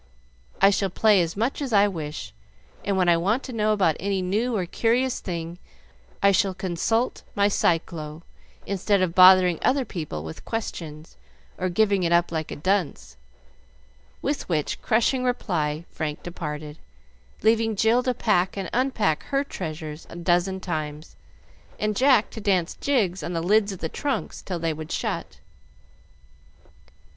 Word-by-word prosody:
I 195 Hz, +1 st, +6 dB
shall 195 Hz, 0 st, 0 dB
play 205 Hz, +1 st, +4 dB
as 170 Hz, +2 st, -3 dB
much 235 Hz, +7 st, -1 dB
as 270 Hz, -3 st, -3 dB
I 205 Hz, -1 st, +5 dB
wish, 155 Hz, -6 st, -6 dB, 0.5 s
and 200 Hz, -1 st, 0 dB
when 180 Hz, -1 st, +2 dB
I 170 Hz, -1 st, +5 dB
want 210 Hz, +10 st, 0 dB
to 255 Hz, -, -7 dB
know 215 Hz, -1 st, +1 dB
about 185 Hz, -7 st, +2 dB
any 195 Hz, +1 st, -1 dB
new 220 Hz, +6 st, 0 dB
or 185 Hz, -, -1 dB
curious 240 Hz, +7 st, +1 dB
thing, 170 Hz, -1 st, -5 dB, 0.6 s
I 200 Hz, -, +6 dB
shall 195 Hz, -1 st, +1 dB
consult 190 Hz, +6 st, -1 dB
my 200 Hz, 0 st, +4 dB
Cyclo, 165 Hz, -4 st, -1 dB, 0.4 s
instead 200 Hz, 0 st, +1 dB
of 175 Hz, -2 st, -1 dB
bothering 185 Hz, -1 st, +7 dB
other 265 Hz, 0 st, +2 dB
people 155 Hz, -, -5 dB
with 80 Hz, 0 st, -8 dB
questions, 165 Hz, -8 st, -6 dB, 0.4 s
or 185 Hz, 0 st, 0 dB
giving 200 Hz, +1 st, +2 dB
it 170 Hz, -1 st, 0 dB
up 170 Hz, 0 st, +3 dB
like 160 Hz, -2 st, -3 dB
a -, -, -5 dB
dunce;" 185 Hz, -, -1 dB, 1.1 s
with 285 Hz, -6 st, -2 dB
which 155 Hz, -4 st, -1 dB
crushing 240 Hz, +3 st, +2 dB
reply 165 Hz, -10 st, -1 dB
Frank 150 Hz, -2 st, -4 dB
departed, 150 Hz, -3 st, -6 dB, 0.6 s
leaving 225 Hz, 0 st, +3 dB
Jill 225 Hz, +4 st, +3 dB
to 250 Hz, -1 st, -1 dB
pack 200 Hz, -5 st, +1 dB
and 190 Hz, -3 st, -4 dB
unpack 230 Hz, -, +1 dB
her 275 Hz, 0 st, 0 dB
treasures 155 Hz, -, -7 dB
a -, -, -10 dB
dozen 175 Hz, +2 st, +1 dB
times, 155 Hz, -3 st, -5 dB, 0.6 s
and 215 Hz, 0 st, -1 dB
Jack 255 Hz, -2 st, +4 dB
to 220 Hz, -, -8 dB
dance 185 Hz, -4 st, +1 dB
jigs 205 Hz, -10 st, +1 dB
on 175 Hz, -, -4 dB
the 165 Hz, -, -1 dB
lids 205 Hz, +2 st, +3 dB
of 190 Hz, -, -6 dB
the 160 Hz, -, -1 dB
trunks 280 Hz, -, -3 dB
till 180 Hz, -, -4 dB
they 165 Hz, -1 st, -1 dB
would 155 Hz, 0 st, -8 dB
shut. -, -, -3 dB
190 Hz, 155 wpm, -25 LUFS, 165-220 Hz, 1.1 s, bothering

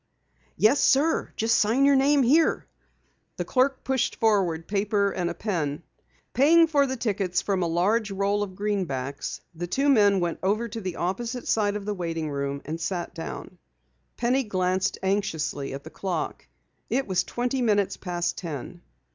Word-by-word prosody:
"Yes, 235 Hz, +7 st, +4 dB
sir. 295 Hz, +5 st, +3 dB
Just 225 Hz, +1 st, +2 dB
sign 235 Hz, +6 st, +3 dB
your 280 Hz, 0 st, +5 dB
name 275 Hz, +1 st, +4 dB
here." 305 Hz, +7 st, +3 dB, 0.7 s
The -, -, -2 dB
clerk 265 Hz, +1 st, +1 dB
pushed 265 Hz, -2 st, 0 dB
forward 190 Hz, -7 st, +1 dB
paper 200 Hz, 0 st, +1 dB
and 180 Hz, -3 st, -2 dB
a 170 Hz, -, -5 dB
pen. 165 Hz, -8 st, -2 dB, 0.5 s
Paying 320 Hz, +7 st, +6 dB
for 285 Hz, -3 st, +3 dB
the 260 Hz, 0 st, -3 dB
tickets 195 Hz, -6 st, -1 dB
from 195 Hz, -2 st, 0 dB
a 170 Hz, -, +1 dB
large 205 Hz, +7 st, +1 dB
roll 200 Hz, +1 st, 0 dB
of 195 Hz, -2 st, -4 dB
greenbacks, 170 Hz, -10 st, -3 dB
the 175 Hz, +1 st, -5 dB
two 275 Hz, +10 st, +1 dB
men 205 Hz, -7 st, +5 dB
went 175 Hz, -2 st, -2 dB
over 215 Hz, +5 st, 0 dB
to 225 Hz, +1 st, -6 dB
the 185 Hz, -3 st, -4 dB
opposite 235 Hz, +8 st, -3 dB
side 205 Hz, -2 st, +1 dB
of 205 Hz, -1 st, -5 dB
the 210 Hz, -, -1 dB
waiting 165 Hz, -4 st, -3 dB
room 140 Hz, 0 st, -3 dB
and 160 Hz, +3 st, -5 dB
sat 175 Hz, 0 st, -3 dB
down. 175 Hz, +1 st, -7 dB, 0.6 s
Penny 255 Hz, +3 st, +1 dB
glanced 185 Hz, -2 st, 0 dB
anxiously 165 Hz, -8 st, -1 dB
at 135 Hz, +1 st, -6 dB
the -, -, -11 dB
clock. 180 Hz, -5 st, -4 dB, 0.4 s
It 270 Hz, -, 0 dB
was 185 Hz, -1 st, +1 dB
twenty 245 Hz, +4 st, -2 dB
minutes 205 Hz, -4 st, +2 dB
past 175 Hz, -2 st, -3 dB
ten. 170 Hz, +1 st, -7 dB
200 Hz, 165 wpm, -26 LUFS, 175-235 Hz, 0.7 s, Paying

